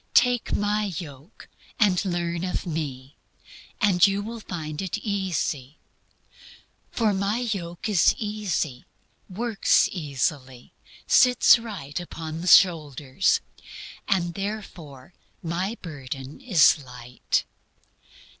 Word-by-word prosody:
Take 245 -2 +3
My 210 +1 0
yoke 145 +2 -10 0.3
and 195 -5 +3
learn 175 -2 -2
of 185 +1 -3
Me, 145 -5 -5 0.6
and 195 -3 +5
you 200 +1 -1
will 230 +2 -6
find 155 -6 -6
it 190 +2 -3
easy. 185 - -3 1.1
For 220 -3 +1
My 200 +3 0
yoke 195 -8 -4
is 200 -6 +4
easy, 205 - -3 0.4
works 220 +2 +2
easily, 135 -5 -3 0.3
sits 250 -1 +6
right 190 -12 -6
upon 165 -2 -7
the 180 - -5
shoulders, 155 -3 +4 0.7
and 175 -4 0
therefore 185 -7 -7 0.3
My 180 +7 -2
burden 140 - -8
is 185 - +5
light." 125 -1 -3
175 Hz, 100 wpm, -25 LUFS, 150-205 Hz, 1.1 s, sits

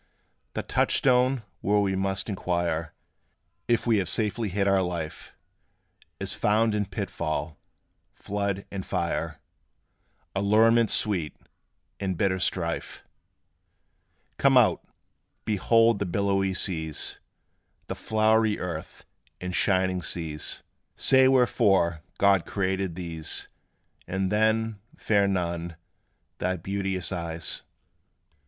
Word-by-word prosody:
The - - -2
touchstone, 125 -1 +2 0.2
where 105 +2 +1
we 95 -2 +1
must 95 0 -1
inquire 85 -5 -2 0.7
If 120 -2 +2
we 115 -2 +3
have 95 - -2
safely 105 0 -1
hid 100 +2 0
our 100 -1 +4
life, 85 -4 -5 0.8
Is - - -2
found 110 +1 +2
in 105 -2 -1
pitfall, 80 -6 -4 0.6
flood, 100 -1 -3
and 95 -1 -4
fire, - - -2 1.0
Allurements 110 +3 +4
sweet, 90 -8 +1 0.6
and 95 -3 -2
bitter 95 0 +1
strife. 85 -2 -3 1.4
Come - - +5
out! - - +4 0.6
behold 115 +1 +3
the 100 - -1
billowy 95 0 0
seas, 80 -6 -1 0.7
The - - -4
flowery 110 0 +2
earth, 85 -3 -6 0.3
and 90 0 -5
shining 95 -1 +2
skies: 80 -4 -3 0.3
Say 130 0 +5
wherefore 105 -10 +3 0.2
God 100 -3 +3
created 95 -2 -1
these; 80 -3 -3 0.6
And 95 +1 -1
then, 110 0 +1 0.2
fair 100 -2 +2
Nun, 85 -3 -2 0.6
thy 95 0 0
beauteous 95 +1 -3
eyes. 85 -2 -3
95 Hz, 105 wpm, -26 LUFS, 90-105 Hz, 1.4 s, Come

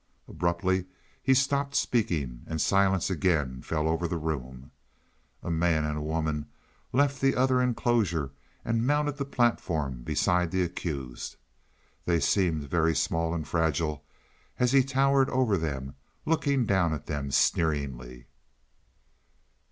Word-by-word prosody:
Abruptly 90 +2 0 0.4
he 130 +1 +3
stopped 140 +1 +1
speaking 75 - 0
and 80 - -3
silence 95 +1 +2
again 75 -9 0
fell 80 -1 -1
over 80 +2 0
the 85 - -2
room. 65 -5 -5 0.7
A 85 - -3
man 80 -1 +2
and 75 0 -2
a 75 - -3
woman 75 -1 -2 0.4
left 140 +1 +1
the 135 0 +3
other 130 0 +3
enclosure 110 - +1 0.3
and 115 +1 0
mounted 145 0 +1
the 140 - -2
platform 80 - 0
beside 90 +7 +1
the 95 +1 +1
accused. 70 -8 -5 0.7
They 85 -1 +2
seemed 85 -5 +1
very 80 +1 +2
small 85 -6 0
and 80 -2 -4
fragile, 80 -2 0 0.5
as 125 -1 +2
he 135 -1 +5
towered 135 0 +2
over 125 -5 +2
them, 70 -6 -3 0.3
looking 140 -5 +1
down 90 -6 +2
at - - -8
them 70 -2 -3
sneeringly. 65 -6 0
85 Hz, 130 wpm, -28 LUFS, 75-120 Hz, 0.7 s, he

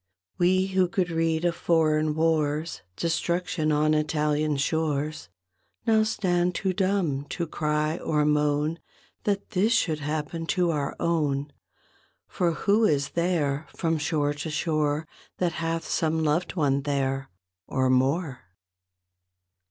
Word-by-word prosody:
We 185 +1 +3
who 190 -1 +2
could 180 -1 -1
read 165 0 0
of 170 -1 +1
foreign 155 -3 +2
wars, 155 0 0
Destruction 170 - -1
on 155 +1 +3
Italian 150 -1 +1
shores, 150 - -1 0.6
Now 220 -2 +4
stand 180 -5 +1
too 190 -1 0
dumb 185 -8 0
to 170 +3 -3
cry 155 0 -1
or 150 -1 +1
moan 150 +2 +1 0.5
That 200 -1 -1
this 210 +3 +2
should 160 -8 +1
happen 155 +2 -3
to 175 -2 +3
our 145 -3 -2
own; 150 -4 0 0.7
For 175 -2 0
who 205 +7 +2
is 140 -8 +2
there 160 -4 0
from 165 -2 0
shore 150 -1 0
to 145 +2 -5
shore 155 0 0 0.3
But 180 -2 +1
hath 165 0 -2
some 160 0 0
loved 155 +5 0
one 140 -4 +2
there, 135 -1 -1 0.4
or 130 -1 +1
more? 135 +2 +1
155 Hz, 130 wpm, -26 LUFS, 150-175 Hz, 0.7 s, Now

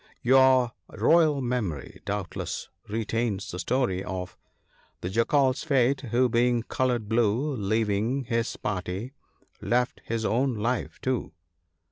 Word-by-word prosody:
Your 130 -1 +5 0.2
royal 155 -4 +3
memory 115 - -3
doubtless 100 -2 -4 0.2
retains 110 -2 -2
the 90 - -6
story 95 -1 0
of 90 -1 -5 0.3
" - - -36
The 90 - -3
Jackal's 130 +5 +2
fate, 135 -3 +2
who 125 +3 +3
being 120 0 +2
coloured 120 -3 -1
blue, 120 +6 +1
Leaving 110 +4 0
his 115 -1 -1
party, 100 +4 -4 0.5
left 125 +1 0
his 115 -1 -2
own 125 +3 +1
life 115 +4 -2
too. 130 -2 -2
120 Hz, 120 wpm, -27 LUFS, 105-130 Hz, 0.5 s, Your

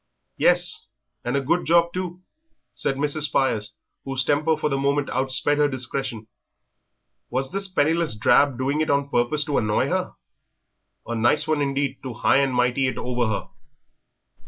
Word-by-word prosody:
"Yes, - - +3 0.4
and 120 +3 -1
a - - 0
good 165 +7 0
job, 170 +1 +3
too," 180 0 -5 0.5
said 135 - 0
Mrs. 150 +2 +1
Spires, 110 -7 0 0.3
whose 135 -1 -1
temper 155 +3 +2
for - - -1
the 140 - -1
moment 140 +1 0
outsped 135 +3 0
her 145 - +4
discretion. 130 -4 -3 1.0
Was 130 +2 -2
this 195 +1 -2
penniless 165 - +1
drab 135 +3 +3
doing 140 +4 0
it 155 - -1
on 140 0 +1
purpose 120 +5 +1
to 145 -3 0
annoy 105 -1 0
her? - - -2 0.9
A 120 - -4
nice 120 +7 +2
one 155 -2 +1
indeed 140 0 -1
to 130 -3 -7
high 120 - +3
and 135 -1 +2
mighty 125 +1 +1
it 130 - -3
over 125 -1 -1
her. 110 -2 -3
140 Hz, 160 wpm, -23 LUFS, 125-150 Hz, 1.0 s, her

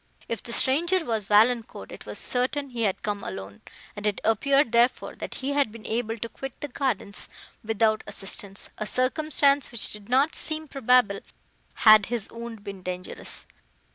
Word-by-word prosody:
If 230 -3 -3
the 235 - -6
stranger 330 +9 +2
was 220 -5 -1
Valancourt, 225 +3 +2
it - - -11
was - - -5
certain 265 +2 -1
he 240 -1 -4
had 200 -4 0
come 205 -1 -2
alone, 95 +1 -7 0.3
and 205 0 -2
it 205 - 0
appeared, 255 +4 +3
therefore, 235 +2 +2
that - - -6
he 275 +1 -3
had 280 -6 +2
been 225 0 -12
able 225 0 -2
to 230 - -4
quit 270 +2 -8
the 290 - -5
gardens, 245 -7 -2 0.3
without 220 0 +1
assistance; 200 -1 -4
a 215 - -2
circumstance 280 +1 +2
which 235 -3 -4
did 210 0 -10
not 270 +5 +3
seem 310 0 0
probable, 250 -7 +3 0.7
had 215 -2 +9
his 230 -3 -3
wound 230 -2 -8
been 200 -2 -7
dangerous. 180 0 -4
230 Hz, 170 wpm, -26 LUFS, 210-265 Hz, 0.7 s, had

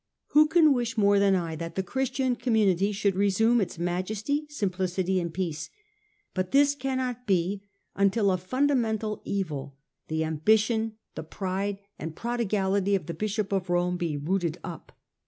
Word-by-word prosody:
Who 305 +1 +6
can 315 -2 +5
wish 240 -1 -2
more 200 -1 +4
than 200 -1 +4
I 165 -3 -2
that 165 +1 -6
the 190 - 0
Christian 260 +2 -1
community 210 -5 +2
should 200 -1 +1
resume 215 +4 +3
its 185 - -3
majesty, 210 - -2
simplicity 185 -6 -1
and 170 -1 -3
peace; 165 -3 -3 0.6
but 185 -1 -1
this 285 +3 +4
cannot 260 -3 -3
be, 195 +1 0 0.3
until 200 +1 +3
the 185 -1 +1
fundamental 225 -1 0
evil, 145 -8 -3 0.3
the 160 0 -1
ambition, 220 +8 +2 0.2
the - - -5
pride 195 +4 -3 0.2
and 160 +1 -5
prodigality 200 -4 0
of 185 - -2
the 170 - -4
Bishop 210 +3 -2
of 190 -2 -1
Rome 175 0 +1
be 165 -4 -2
rooted 170 +2 -1
up. 170 -3 -8
200 Hz, 155 wpm, -27 LUFS, 180-230 Hz, 0.6 s, Who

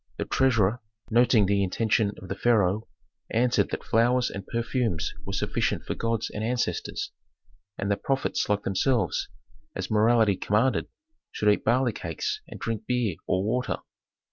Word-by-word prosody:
The - - -2
treasurer, 120 -4 +2 0.3
noting 115 -2 +5
the 100 +1 +2
intention 105 +2 +1
of 95 - -10
the - - -2
pharaoh, 110 -3 +2 0.4
answered 120 +2 +2
that - - -4
flowers 120 +2 +2
and 100 -1 -7
perfumes 115 - -1
were - - -3
sufficient - - -1
for - - -2
gods 115 -1 -1
and 105 - -4
ancestors, 120 +2 -2 0.7
and 100 - -1
that 100 - -1
prophets 135 -5 0
like 105 0 +1
themselves, 95 - +1 0.5
as 95 +1 -4
morality 110 -2 +4
commanded, 110 +6 +1 0.4
should 105 - +1
eat - - -3
barley 120 +1 +2
cakes 80 -5 -3
and - - -9
drink 110 -1 -4
beer 125 -7 0
or 95 +1 +1
water. 125 +5 -1
110 Hz, 150 wpm, -27 LUFS, 100-120 Hz, 0.7 s, noting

